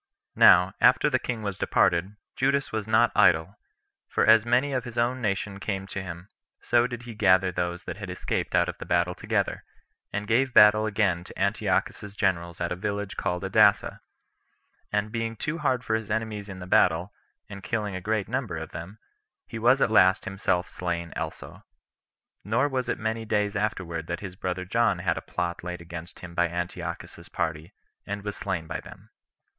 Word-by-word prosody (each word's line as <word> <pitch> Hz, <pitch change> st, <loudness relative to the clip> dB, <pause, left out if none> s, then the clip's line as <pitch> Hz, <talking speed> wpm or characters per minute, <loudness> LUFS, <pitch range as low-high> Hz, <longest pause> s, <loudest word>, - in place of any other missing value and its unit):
Now, 90 Hz, +1 st, +7 dB
after 150 Hz, +3 st, +5 dB
the 130 Hz, -, +2 dB
king 115 Hz, -3 st, -4 dB
was 100 Hz, -2 st, -4 dB
departed, 90 Hz, +4 st, +2 dB, 0.2 s
Judas 140 Hz, +1 st, +1 dB
was 110 Hz, -1 st, -3 dB
not 110 Hz, +2 st, +4 dB
idle; 95 Hz, +6 st, +3 dB, 0.5 s
for -, -, +1 dB
as 110 Hz, +1 st, +6 dB
many 130 Hz, +4 st, +2 dB
of 130 Hz, -2 st, -1 dB
his 120 Hz, -1 st, -9 dB
own 125 Hz, +2 st, +1 dB
nation 100 Hz, -2 st, -2 dB
came 95 Hz, -1 st, -3 dB
to 100 Hz, 0 st, -5 dB
him, 90 Hz, 0 st, -8 dB, 0.3 s
so 120 Hz, 0 st, +2 dB
did 120 Hz, -1 st, -7 dB
he 120 Hz, -2 st, -8 dB
gather 95 Hz, -3 st, +3 dB
those 90 Hz, 0 st, -3 dB
that -, -, -6 dB
had -, -, -7 dB
escaped -, -, -2 dB
out -, -, +3 dB
of -, -, -6 dB
the -, -, -6 dB
battle 85 Hz, +1 st, +1 dB
together, -, -, -2 dB, 0.5 s
and 105 Hz, 0 st, -3 dB
gave 125 Hz, +3 st, +1 dB
battle 110 Hz, +1 st, +7 dB
again 100 Hz, -5 st, +1 dB
to -, -, -12 dB
Antiochus's 105 Hz, -1 st, -1 dB
generals 85 Hz, -4 st, -1 dB
at 85 Hz, -, -2 dB
a -, -, 0 dB
village 100 Hz, +1 st, -4 dB
called 90 Hz, -2 st, -2 dB
Adasa; -, -, +3 dB, 0.9 s
and 105 Hz, +1 st, -1 dB
being 115 Hz, 0 st, -3 dB
too 150 Hz, +9 st, -3 dB
hard 130 Hz, -4 st, 0 dB
for 110 Hz, -, -1 dB
his 110 Hz, -1 st, -2 dB
enemies 105 Hz, -2 st, -3 dB
in 95 Hz, -, -7 dB
the 90 Hz, -, -8 dB
battle, 90 Hz, +1 st, +2 dB, 0.3 s
and 100 Hz, 0 st, -9 dB
killing 105 Hz, -2 st, -3 dB
a 95 Hz, -, -5 dB
great 110 Hz, +1 st, -1 dB
number 120 Hz, -8 st, -3 dB
of 80 Hz, 0 st, -7 dB
them, 95 Hz, +6 st, -8 dB, 0.5 s
he 115 Hz, -, -7 dB
was 125 Hz, +4 st, +4 dB
at 110 Hz, -, +1 dB
last 95 Hz, -3 st, +5 dB
himself 95 Hz, -2 st, -1 dB
slain 85 Hz, -2 st, -4 dB
also. -, -, -6 dB, 0.8 s
Nor 120 Hz, +8 st, +1 dB
was 130 Hz, -2 st, -2 dB
it -, -, 0 dB
many 110 Hz, 0 st, -2 dB
days 105 Hz, -2 st, 0 dB
afterward 95 Hz, -6 st, -2 dB
that 85 Hz, -, -4 dB
his 95 Hz, -3 st, -7 dB
brother 90 Hz, -1 st, -3 dB
John 110 Hz, 0 st, +2 dB
had 90 Hz, -2 st, -1 dB
a -, -, -13 dB
plot 85 Hz, -1 st, -4 dB
laid 90 Hz, 0 st, -5 dB
against 85 Hz, 0 st, -9 dB
him 90 Hz, -1 st, -9 dB
by 85 Hz, 0 st, +2 dB
Antiochus's 85 Hz, +1 st, -6 dB
party, 80 Hz, -1 st, -3 dB, 0.3 s
and 100 Hz, 0 st, -4 dB
was 105 Hz, -1 st, -4 dB
slain 80 Hz, -3 st, -3 dB
by -, -, -4 dB
them. -, -, -14 dB
100 Hz, 190 wpm, -26 LUFS, 90-110 Hz, 0.9 s, Now